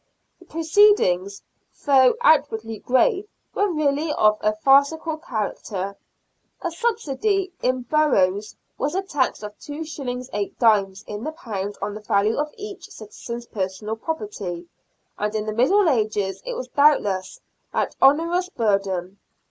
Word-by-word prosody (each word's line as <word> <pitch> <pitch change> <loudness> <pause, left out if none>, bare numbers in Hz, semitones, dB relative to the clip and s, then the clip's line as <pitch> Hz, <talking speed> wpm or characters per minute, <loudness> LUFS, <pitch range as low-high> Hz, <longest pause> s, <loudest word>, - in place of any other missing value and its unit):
The 360 - -17
proceedings, 315 - +3 0.4
though 265 -3 +5
outwardly 225 -8 +2
grave, 390 - +2 0.3
were 410 0 +1
really 305 0 0
of 215 0 +3
a 215 0 +1
farcical 280 +7 +3
character. 205 - -4 0.7
A 345 - -1
subsidy 390 - -1
in 255 0 0
boroughs 215 -8 +1 0.2
was 295 +4 -1
a 385 - 0
tax 285 - -1
of 210 0 -7
2s. 305 +1 -7 0.3
8d. 205 -1 +1
in 210 +1 -6
the 310 - -3
pound 205 - -5
on 205 - -3
the 215 - -8
value 210 +1 +1
of 300 +1 -1
each 415 -2 -8
citizen's 235 +2 -8
personal 205 +1 -4
property, 225 - -5 0.5
and 210 +1 -2
in 215 -1 -1
the 215 - -3
Middle 340 - +3
Ages 210 -7 0
it - - -3
was - - -5
doubtless 205 -11 +2 0.3
an - - 0
onerous 335 +6 +3
burden. 195 - -1
250 Hz, 130 wpm, -23 LUFS, 210-320 Hz, 0.7 s, though